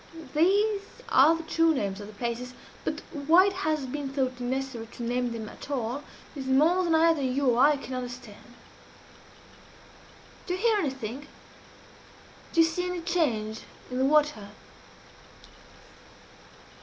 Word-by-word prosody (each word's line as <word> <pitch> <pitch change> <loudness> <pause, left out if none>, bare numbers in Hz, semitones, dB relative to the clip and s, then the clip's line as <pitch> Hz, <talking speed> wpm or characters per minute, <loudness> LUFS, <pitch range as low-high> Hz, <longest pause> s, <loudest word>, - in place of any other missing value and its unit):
These 400 +6 +3 0.3
are 300 +5 +6
the 330 - -7
true 325 0 +2
names 200 -5 -2
of 205 - -8
the 215 - -11
places 240 +3 -4 0.3
but - - -3
why 320 +5 +5
it 395 - 0
has 315 -7 -1
been 275 +2 -4
thought 260 -2 -2
necessary 250 -2 -3
to 240 - -7
name 245 +1 -1
them 225 -2 -5
at - - -11
all 255 0 -2 0.3
is 270 -2 -6
more 315 +8 +4
than 335 -2 +2
either 325 -1 +4
you 265 +1 +1
or 235 - +1
I 290 +2 +5
can 270 -1 -8
understand. 245 -1 -8 1.9
Do 360 - -1
you - - -6
hear 450 0 +3
anything? 270 - -4 1.2
Do 335 - +4
you - - +6
see 355 +2 -2
any 360 -1 -3
change 225 -11 0 0.3
in 250 - -2
the 265 - +3
water?" 295 -8 +2
275 Hz, 145 wpm, -27 LUFS, 245-330 Hz, 1.9 s, are